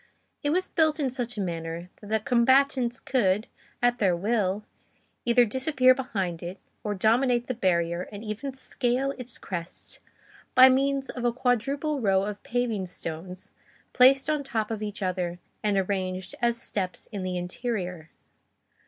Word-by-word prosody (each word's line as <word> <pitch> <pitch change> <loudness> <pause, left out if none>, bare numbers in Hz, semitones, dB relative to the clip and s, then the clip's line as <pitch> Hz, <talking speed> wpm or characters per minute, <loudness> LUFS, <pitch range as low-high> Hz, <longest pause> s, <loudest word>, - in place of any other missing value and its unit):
It 290 - 0
was 365 +5 +1
built 315 -2 +2
in 270 -4 0
such 245 -2 -4
a - - -1
manner 170 0 -4
that 205 - -13
the 220 +1 +1
combatants 250 +1 +3
could, 215 -5 +1 0.4
at 245 0 +3
their 190 -4 +3
will, 205 +1 0 0.6
either 240 0 +5
disappear 260 +2 +4
behind 195 -10 -3
it 175 +3 -6 0.3
or 210 -1 -2
dominate 240 +4 +3
the 255 - -2
barrier 175 -5 0
and 205 +1 -8
even 230 +5 -5
scale 265 0 -1
its 250 -1 -6
crest 170 -2 -6 0.6
by 255 +1 +10
means 270 +1 +1
of 245 - -6
a 240 - +3
quadruple 275 +5 0
row 195 -3 +3
of 205 0 -4
paving 230 -6 -1
stones 180 +1 -7 0.4
placed 265 +2 +6
on 305 -2 0
top 225 -5 -2
of 220 -1 -3
each 210 -1 -4
other 180 -2 -1 0.2
and 205 -2 +1
arranged 185 -1 -2
as 235 -1 +2
steps 185 -5 -2
in 205 -3 -4
the 185 -1 -2
interior. 180 -3 -4
220 Hz, 155 wpm, -27 LUFS, 185-255 Hz, 0.6 s, by